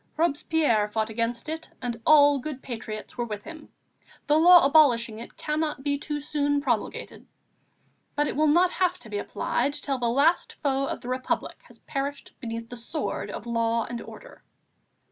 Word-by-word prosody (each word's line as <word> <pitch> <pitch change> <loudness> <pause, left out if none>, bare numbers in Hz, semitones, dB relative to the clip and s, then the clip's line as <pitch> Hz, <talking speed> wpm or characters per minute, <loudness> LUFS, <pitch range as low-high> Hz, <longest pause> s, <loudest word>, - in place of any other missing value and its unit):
Robespierre 295 -8 +2
fought 220 +1 -2
against 230 +3 -2
it, 320 +1 -5
and 240 -2 -4
all 290 -2 +7
good 270 0 -6
patriots 225 -1 -7
were - - +1
with 210 -3 -6
him; 320 -2 -10 0.6
the 295 - +3
law 345 0 +8
abolishing 240 -7 +4
it 235 - -11
cannot 300 -2 -2
be 285 0 +1
too 295 0 -3
soon 290 -1 0
promulgated. 245 -6 -3 0.9
But 295 0 +1
it - - -3
will 305 +2 +3
not 350 +4 +4
have 365 -1 +1
to 225 -11 -13
be 205 - -2
applied 265 +6 -1
till 280 -2 -2
the 240 -1 0
last 285 +8 +2
foe 275 -1 +1
of - - -4
the - - -9
Republic 255 0 -2
has - - -17
perished 280 0 -5
beneath 230 -2 -5
the 245 - -7
sword 240 +7 -3
of - - -7
law 230 -1 0
and 235 -1 -6
order." - - -12
275 Hz, 175 wpm, -26 LUFS, 235-305 Hz, 0.9 s, law